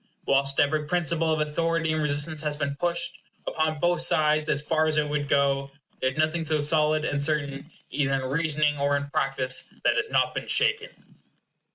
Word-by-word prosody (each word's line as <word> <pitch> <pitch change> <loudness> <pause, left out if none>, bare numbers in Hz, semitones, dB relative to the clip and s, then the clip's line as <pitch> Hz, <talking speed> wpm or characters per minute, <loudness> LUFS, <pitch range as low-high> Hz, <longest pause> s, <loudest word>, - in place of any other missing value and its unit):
Whilst 135 0 +1
every 150 +1 +1
principle 165 -1 0
of 155 - 0
authority 165 +1 0
and 155 - -1
resistance 150 +1 +1
has 150 -1 -3
been 140 -1 -2
pushed, 170 +1 -2 0.3
upon 155 0 -1
both 175 +1 +1
sides, 155 0 +2
as 145 0 +1
far 160 +1 +1
as 155 -1 0
it 150 -1 +1
would 145 -1 -3
go, 140 -1 +1 0.3
there 130 - +2
is 135 - -13
nothing 155 +2 0
so 155 -1 +1
solid 155 +1 +2
and 140 -2 -1
certain, 145 -1 -1 0.2
either 135 -2 0
in 135 - -1
reasoning 150 +1 0
or 140 0 +1
in 140 0 -6
practice, 130 -2 0 0.2
that - - +2
has 425 +1 -1
not - - +1
been - - -5
shaken. 435 +4 +2
150 Hz, 190 wpm, -26 LUFS, 140-160 Hz, 0.3 s, sides